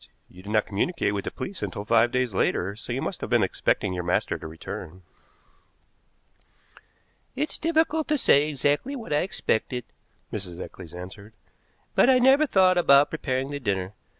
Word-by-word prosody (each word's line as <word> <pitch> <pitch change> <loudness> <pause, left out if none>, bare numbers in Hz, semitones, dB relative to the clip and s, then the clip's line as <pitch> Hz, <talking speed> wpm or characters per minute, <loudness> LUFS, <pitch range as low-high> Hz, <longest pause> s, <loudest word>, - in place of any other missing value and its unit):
"You 90 - -15
did 100 - -10
not 110 -1 +2
communicate 110 - -1
with 100 -1 -3
the - - -1
police 195 -1 -6
until 100 0 -4
five 115 +2 +4
days 125 -4 0
later, 95 +1 0
so 110 - -8
you - - -2
must - - -4
have - - -4
been - - +3
expecting 95 - 0
your 90 -1 -3
master 90 +1 0
to - - -7
return." 80 +2 -8 2.3
"It's 295 +3 -3
difficult 320 -1 +1
to 300 - +1
say 150 - +4
exactly 145 - 0
what 230 - -5
I - - +3
expected," 125 - -1 0.5
Mrs. 95 -4 -4
Eccles 85 -2 -9
answered, 100 +4 -10 0.6
"but - - +4
I 260 - +6
never 270 +4 +5
thought 185 -5 +4
about 140 -4 +5
preparing 135 -3 -2
the 145 - -4
dinner. 100 -5 -2
125 Hz, 170 wpm, -25 LUFS, -, 2.3 s, I